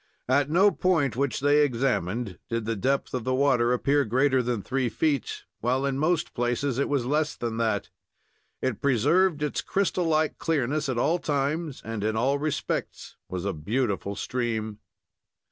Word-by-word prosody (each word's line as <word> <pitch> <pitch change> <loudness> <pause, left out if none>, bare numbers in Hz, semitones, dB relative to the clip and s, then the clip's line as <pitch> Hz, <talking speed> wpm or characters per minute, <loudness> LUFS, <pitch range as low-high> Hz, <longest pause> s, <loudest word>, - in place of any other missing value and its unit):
At 135 +2 +2
no 190 +6 +5
point 160 - +1
which 140 +1 -1
they 145 +1 +4
examined 120 -6 -1
did 115 -1 -2
the 115 +1 -1
depth 135 +7 -1
of 125 -3 -2
the 130 +1 0
water 130 -3 +3
appear 140 +3 +2
greater 130 +3 +2
than 120 -4 -2
three 130 -2 -1
feet, 140 +3 -1 0.2
while 130 +4 0
in 135 -1 -1
most 160 +1 0
places 120 +2 -1
it 140 - 0
was 140 -4 0
less 150 +3 0
than 115 -1 -4
that. 115 -1 -1 0.7
It 130 -5 -1
preserved 150 - +3
its 150 - -1
crystal 190 -2 0
like 155 -1 +1
clearness 150 -1 0
at 130 - -1
all 160 +8 +2
times, 145 +1 -2
and 110 -2 -4
in 110 +1 0
all 135 +5 +1
respects 145 -4 -3
was 90 0 -4
a 100 - -1
beautiful 100 - -2
stream. 110 -4 -3
130 Hz, 165 wpm, -26 LUFS, 120-145 Hz, 0.7 s, no